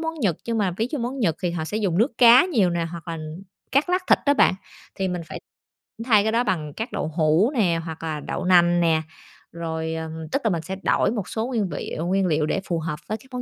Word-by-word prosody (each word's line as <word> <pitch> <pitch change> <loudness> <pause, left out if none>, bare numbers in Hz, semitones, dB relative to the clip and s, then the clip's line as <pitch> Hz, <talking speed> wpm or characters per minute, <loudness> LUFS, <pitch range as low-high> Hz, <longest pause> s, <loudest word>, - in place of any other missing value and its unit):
món 325 0 -3
Nhật 185 -8 +1
nhưng 230 -1 -1
mà 195 -3 +1
ví 225 +3 -1
dụ 295 - -2
món 250 +3 -3
Nhật 170 -10 +1
thì 180 - 0
họ 165 -2 -3
sẽ 210 - -4
dùng 195 -5 0
nước 235 +1 +1
cá 240 +3 +8
nhiều 220 - +2
nè 170 -1 -1
hoặc 170 -1 -9
là 165 -1 -4 0.5
cắt 285 +6 +3
lát 365 +1 +1
thịt - - +6
á 285 0 +4
bạn. 185 - +4 0.4
Thì 190 -1 -2
mình 180 -1 -3
phải - - -7 0.7
thay 215 -5 +5
cái 220 - 0
đó 235 +2 +2
bằng 155 -9 -2
các 225 +1 -5
đậu 200 -6 -2
hũ 160 - +3
nè 175 -9 +2
hoặc 160 0 -7
là 155 -2 -3
đậu 165 - -4
nành 175 -1 +5
nè, 160 -1 +3 0.5
rồi 160 -1 -4
ờ, 160 0 -4 0.2
tức 275 - 0
là 225 - +2
mình 170 -4 -1
sẽ 190 +4 -5
đổi - - +2
một 210 -6 -3
số 225 +2 -2
nguyên 220 -7 -1
vị 145 - -5
nguyên 195 +1 +1
liệu 155 -2 +1
để 195 - -1
phù 170 -2 -1
hợp 155 -2 -4
với 215 - -1
các - - -20
món 250 - -3
185 Hz, 260 wpm, -23 LUFS, 165-230 Hz, 0.7 s, cá